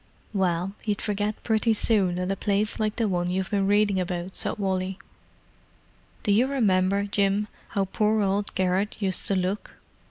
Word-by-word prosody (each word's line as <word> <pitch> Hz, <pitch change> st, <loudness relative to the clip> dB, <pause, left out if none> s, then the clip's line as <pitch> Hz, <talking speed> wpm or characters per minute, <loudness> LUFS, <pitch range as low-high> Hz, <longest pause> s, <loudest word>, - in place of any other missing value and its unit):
"Well, 185 Hz, -1 st, 0 dB
you'd 210 Hz, -2 st, -1 dB
forget 210 Hz, 0 st, -1 dB
pretty 220 Hz, 0 st, +2 dB
soon 195 Hz, -5 st, +2 dB
at 180 Hz, +1 st, -1 dB
a -, -, 0 dB
place 205 Hz, +2 st, 0 dB
like 215 Hz, -1 st, 0 dB
the 230 Hz, -2 st, +1 dB
one 175 Hz, -2 st, 0 dB
you've 185 Hz, +2 st, -2 dB
been 200 Hz, -2 st, +1 dB
reading 205 Hz, -1 st, +3 dB
about," 180 Hz, 0 st, -3 dB
said -, -, -2 dB
Wally. 190 Hz, -1 st, -1 dB, 1.3 s
"Do 205 Hz, -, +2 dB
you 230 Hz, +6 st, +4 dB
remember, 200 Hz, -7 st, +2 dB
Jim, 200 Hz, 0 st, +1 dB, 0.2 s
how 200 Hz, -, -1 dB
old 190 Hz, -, -3 dB
poor 215 Hz, -1 st, +2 dB
old 200 Hz, +1 st, -1 dB
Garrett 190 Hz, +3 st, 0 dB
used 190 Hz, -3 st, -1 dB
to 200 Hz, -, +1 dB
look? 185 Hz, +3 st, -2 dB
200 Hz, 170 wpm, -26 LUFS, 185-210 Hz, 1.3 s, you